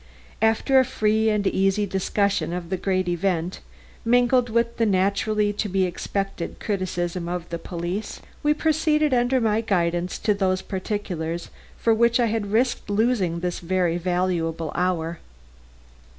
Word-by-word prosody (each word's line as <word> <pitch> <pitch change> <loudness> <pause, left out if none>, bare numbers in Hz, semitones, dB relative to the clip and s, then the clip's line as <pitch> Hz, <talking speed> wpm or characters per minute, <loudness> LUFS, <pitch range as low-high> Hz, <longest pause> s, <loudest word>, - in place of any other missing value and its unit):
After 225 +5 +4
a - - +5
free 220 -3 +1
and 210 -1 0
easy 195 +2 +2
discussion 195 -3 0
of 175 0 -5
the - - +2
great 185 0 0
event, 175 0 -1 0.4
mingled 245 +1 +3
with 235 +1 0
the 230 - +2
naturally 205 +2 +1
to 205 0 -2
be 190 0 +1
expected 185 0 -4
criticism 180 -3 -2
of 175 -1 -4
the 170 0 -4
police, 175 +5 -4 0.2
we 300 0 +2
proceeded 305 -2 +2
under 245 +1 +3
my 220 -2 +1
guidance 175 -4 0
to 210 -1 +1
those 190 -2 0
particulars 185 -4 -4 0.3
for 230 - +3
which 235 +2 +3
I 240 - +4
had 215 -3 -2
risked 240 0 +1
losing 205 -6 +1
this 180 -1 -2
very 175 -1 0
valuable 175 -3 -1
hour. 170 -2 -1
195 Hz, 145 wpm, -24 LUFS, 175-225 Hz, 0.4 s, a